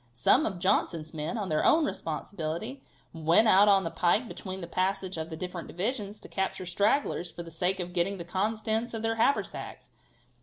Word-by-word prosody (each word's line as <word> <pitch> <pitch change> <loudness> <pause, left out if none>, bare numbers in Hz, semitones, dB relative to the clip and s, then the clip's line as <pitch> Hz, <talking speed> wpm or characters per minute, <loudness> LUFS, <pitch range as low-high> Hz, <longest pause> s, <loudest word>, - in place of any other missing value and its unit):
Some 125 - +3
of 190 - -4
Johnson's 170 -3 0
men, 155 +9 -3
on 200 -4 -3
their 155 - +1
own 320 -1 +5
responsibility, 170 - -4 0.3
went 165 +7 +4
out 205 0 +7
on 195 -1 +5
the 165 - -3
pike 205 +8 +2
between 190 -3 -6
the - - -4
passage 185 +2 -1
of 160 0 -4
the 160 - -6
different 180 0 -5
divisions, 210 +1 -3
to - - -10
capture 190 -1 -2
stragglers 200 0 +1
for 170 - -7
the 165 - -11
sake 180 +4 0
of 180 0 -5
getting 185 +3 0
the 170 - -6
contents 220 +5 -1
of 225 - -4
their 225 0 0
haversacks. 275 +5 -1
190 Hz, 190 wpm, -29 LUFS, 170-215 Hz, 0.3 s, out